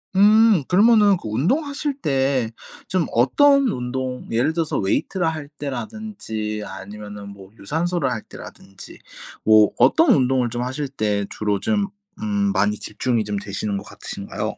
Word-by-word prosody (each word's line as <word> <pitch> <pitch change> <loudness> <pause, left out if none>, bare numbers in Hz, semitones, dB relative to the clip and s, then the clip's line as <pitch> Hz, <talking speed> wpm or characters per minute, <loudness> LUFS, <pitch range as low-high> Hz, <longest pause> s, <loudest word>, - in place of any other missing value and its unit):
음. 210 -2 +5
그러면은 205 0 +5
그 140 - -9
운동하실 280 - 0
때 135 -4 +1 0.4
좀 185 -3 0
어떤 275 - +4
운동 125 - -4
예를 120 +7 +1
들어서 165 -2 -1
웨이트를 165 - 0
할 155 -3 -3
때라든지 120 - -5
아니면은 105 +1 -9
뭐 100 -1 -13
유산소를 165 - -1
할 110 - -3
때라든지 95 0 -12 0.5
뭐 110 -1 +6
어떤 325 +1 +4
운동을 130 -3 +2
좀 120 +1 -3
하실 130 +3 -3
때 105 -6 -1
주로 105 -2 -1
좀 205 -2 0 0.3
음 205 -2 0
많이 105 - +1
집중이 115 +2 -1
좀 105 0 -3
되시는 100 0 -3
것 - - -6
같으신가요? - - -6
130 Hz, 300 characters per minute, -22 LUFS, -, 0.5 s, 뭐